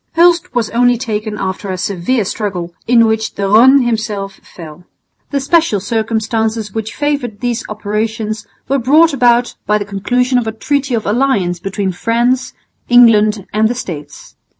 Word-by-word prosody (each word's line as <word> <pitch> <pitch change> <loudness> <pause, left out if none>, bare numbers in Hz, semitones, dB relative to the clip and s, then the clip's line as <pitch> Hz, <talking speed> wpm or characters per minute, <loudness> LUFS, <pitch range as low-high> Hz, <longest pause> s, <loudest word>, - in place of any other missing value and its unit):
Hulst 340 -5 +3
was 230 -3 0
only 245 +1 +3
taken 215 -3 -4
after 190 0 -4
a 185 - -3
severe 200 +5 -1
struggle, 180 -5 -4
in 230 -1 +5
which 220 0 -1
De 200 - -4
Rosne 245 +7 +5
himself 210 -4 -2
fell. 165 0 -12 0.5
The 280 - -1
special 295 - +2
circumstances 220 0 -2
which 220 0 -5
favoured 285 -8 -2
these 245 +1 -2
operations 215 +1 -3 0.2
were 275 +1 +1
brought 300 +6 +4
about 245 -2 +2
by 210 - +3
the 205 - -4
conclusion 245 +6 0
of 230 - -4
a - - -1
treaty 275 0 -1
of 220 - -3
alliance 205 -7 0
between 195 +1 -3
France, 235 +6 0 0.4
England 215 -4 +5
and 215 +1 +3
the 245 - -2
States. 150 -11 -8
220 Hz, 155 wpm, -15 LUFS, 205-245 Hz, 0.5 s, in